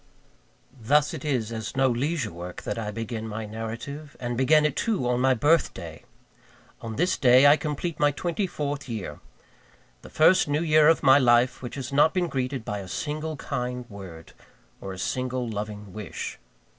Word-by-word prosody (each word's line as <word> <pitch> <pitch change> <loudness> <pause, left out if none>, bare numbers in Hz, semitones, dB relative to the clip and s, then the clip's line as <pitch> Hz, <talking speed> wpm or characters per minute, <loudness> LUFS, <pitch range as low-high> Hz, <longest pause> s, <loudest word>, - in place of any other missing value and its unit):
Thus 145 +7 +3
it 155 - -6
is 125 -7 -1
as 110 +1 -5
no 135 0 +4
leisure 130 - -1
work 85 +1 -8
that - - -3
I 105 -2 -3
begin 115 +1 -5
my 110 0 -5
narrative 115 +7 -7
and 120 -1 -3
begin 150 +5 +4
it, 150 -2 0
too, 200 - 0
on 125 0 +1
my 130 0 +4
birthday! 110 - 0 0.8
On 115 -1 -6
this 175 +8 +1
day 130 +1 +6
I 145 +1 +8
complete 155 +2 -4
my 145 - +4
twenty 175 +6 -2
fourth 145 -5 -4
year; 110 -5 -5 0.8
the - - -12
first 160 +3 +4
new 145 +3 0
year 155 -2 +5
of 165 - +4
my 135 +1 +7
life 120 0 +3
which 125 -2 -6
has 135 -1 -6
not 150 +4 +4
been 180 -2 +1
greeted 130 -3 -3
by 105 - -3
a 95 - -8
single 155 - -4
kind 125 -1 -4
word, 90 -5 -10 0.5
or 95 - -6
a 95 - -7
single 125 +4 -2
loving 105 -2 -6
wish. 105 -4 -6
130 Hz, 180 wpm, -26 LUFS, 110-150 Hz, 0.8 s, I